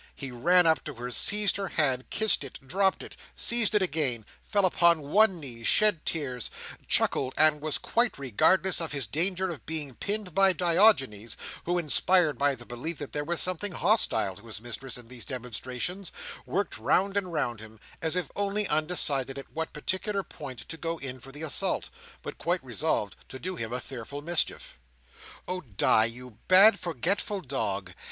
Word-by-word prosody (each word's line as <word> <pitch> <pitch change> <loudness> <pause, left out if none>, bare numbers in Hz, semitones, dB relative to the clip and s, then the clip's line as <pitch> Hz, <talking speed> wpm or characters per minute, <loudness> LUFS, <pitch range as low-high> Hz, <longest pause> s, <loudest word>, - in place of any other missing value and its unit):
He 135 -3 -5
ran 175 +9 +4
up 160 -1 +3
to 150 - -6
her, 120 +1 -6
seized 205 - +4
her 195 -1 -3
hand, 130 -5 0
kissed 220 -8 +2
it, 135 - -8
dropped 190 +5 +1
it, - - -11 0.2
seized 230 -3 +4
it 205 - +4
again, 135 - -1 0.2
fell 200 -3 +1
upon 170 -2 +3
one 205 -3 +4
knee, 120 -6 -8
shed 210 - +4
tears, 130 -7 -3 0.4
chuckled, 130 -1 +1
and 155 -1 +5
was 155 -1 0
quite 235 +1 0
regardless 175 - +2
of 160 -2 -2
his 140 -4 -1
danger 180 - -1
of 160 - -8
being 150 -4 -4
pinned 200 - -4
by 195 +1 +4
Diogenes, 165 - +3 0.3
who, 175 +1 0
inspired 175 0 +2
by 140 -1 +2
the 120 -1 -10
belief 135 +8 -5
that 145 - -8
there 145 - -2
was 170 +2 -1
something 185 +2 -1
hostile 110 - +2
to 110 +3 -14
his 110 -2 -6
mistress 120 +3 -4
in 120 -2 -9
these 120 -1 -8
demonstrations, 130 - -5 0.4
worked 185 - -2
round 195 - +1
and 190 -3 -1
round 120 -8 -2
him, 110 0 -11 0.2
as 160 +1 +1
if 180 - -2
only 205 +1 0
undecided 150 -4 +1
at 140 - -10
what 160 0 -4
particular 190 +6 -2
point 135 -8 -10
to 165 - -5
go 165 +1 -3
in 130 -3 -4
for 135 +2 -11
the 145 +3 -7
assault, 155 - 0 0.3
but - - -8
quite - - -1
resolved - - -1
to 130 - -8
do 185 +7 -4
him 115 -8 -5
a 125 - -2
fearful 135 +3 -8
mischief. 170 - -1 0.7
"Oh 180 0 -2
Di, 110 - +2
you 120 0 -6
bad, 195 +4 +7
forgetful 180 - -2
dog! 100 - -3
155 Hz, 180 wpm, -27 LUFS, 125-185 Hz, 0.7 s, bad